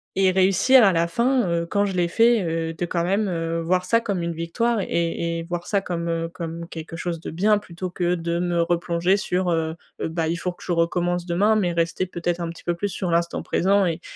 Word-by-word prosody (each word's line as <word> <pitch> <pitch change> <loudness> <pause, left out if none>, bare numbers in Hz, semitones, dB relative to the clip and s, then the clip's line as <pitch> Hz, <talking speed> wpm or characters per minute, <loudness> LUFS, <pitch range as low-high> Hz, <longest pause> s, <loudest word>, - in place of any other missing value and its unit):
et 190 -1 +4
réussir 190 +7 +5
à 195 - +6
la 170 0 +2
fin, 235 +3 +1
heu, 170 0 0
quand 200 +4 +1
je 195 - -2
l'ai 175 -1 +2
fait, 230 +2 +4
heu, 165 -1 -2
de 175 +2 -3
quand 170 0 -1
même, 200 +3 +1
heu, 165 -1 -2
voir 180 +2 +1
ça 230 +4 +3
comme 200 -6 -2
une 170 0 -2
victoire, 210 +8 -1
et 170 -1 -1
et - - -5
voir 175 +1 -4
ça 200 - +1
comme, 170 -3 -4
heu, 165 0 -1
comme 170 -1 -6
quelque 165 0 -8
chose 170 -1 -3
de - - -6
bien. 205 +5 +3
Plutôt 185 -2 -6
que 175 0 0
de 170 0 -2
me 175 -1 +1
replonger 170 +2 +1
sur, 180 -2 -1
heu, 160 -1 -1 0.2
bah 160 0 -2
il 165 - 0
faut 180 +1 -3
que 175 - -15
je 180 - -4
recommence 175 +1 0
demain, 195 +5 +2
mais 185 -5 +1
rester 170 +2 0
peut-être 175 -1 -3
un 170 - -2
petit 165 - -10
peu 175 - 0
plus 205 +4 -2
sur 185 -2 -3
l'instant 170 0 0
présent 195 +2 +2
et 170 0 -2
175 Hz, 235 wpm, -23 LUFS, 170-190 Hz, 0.2 s, à